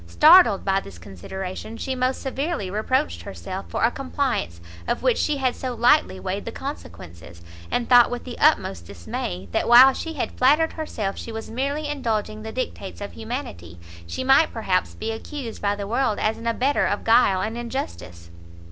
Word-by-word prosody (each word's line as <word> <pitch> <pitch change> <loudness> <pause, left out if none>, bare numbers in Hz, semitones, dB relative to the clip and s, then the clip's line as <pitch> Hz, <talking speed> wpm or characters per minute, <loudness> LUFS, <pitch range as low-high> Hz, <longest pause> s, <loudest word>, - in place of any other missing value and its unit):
Startled 305 - +6
by 195 0 +2
this 100 - -11
consideration, 185 - -7
she 265 - -3
most 255 0 -1
severely 270 - -3
reproached 210 - -1
herself 95 - -7
for - - -2
a 230 - +4
compliance 260 - -2 0.3
of - - -1
which - - +2
she 300 -2 0
had 260 -2 0
so 255 -2 -4
lightly 240 -3 +3
weighed 190 +2 -4
the 230 - -4
consequences, 85 - -9 0.3
and 240 -1 -1
thought 245 -1 +7
with 245 - -5
the 250 - -8
utmost 95 - +2
dismay, 90 0 -5
that - - 0
while 255 +3 +9
she 325 +3 -5
had 295 - -3
flattered 300 +5 +3
herself 215 -11 -4
she 230 - -7
was 225 0 -7
merely 280 +5 -2
indulging 220 -7 -2
the 220 0 -6
dictates 220 -5 -5
of 205 0 -6
humanity, 220 - -7 0.3
she 170 - -4
might 270 +4 +4
perhaps 190 -5 -1
be 225 - -4
accused 235 +1 -7
by 205 0 +1
the 200 -1 -5
world 225 0 0
as 215 - 0
an 230 - -6
abettor 255 +5 +1
of 205 - -2
guile 225 -5 +4
and 220 +4 -3
injustice. 235 - -6
230 Hz, 180 wpm, -23 LUFS, 190-265 Hz, 0.3 s, while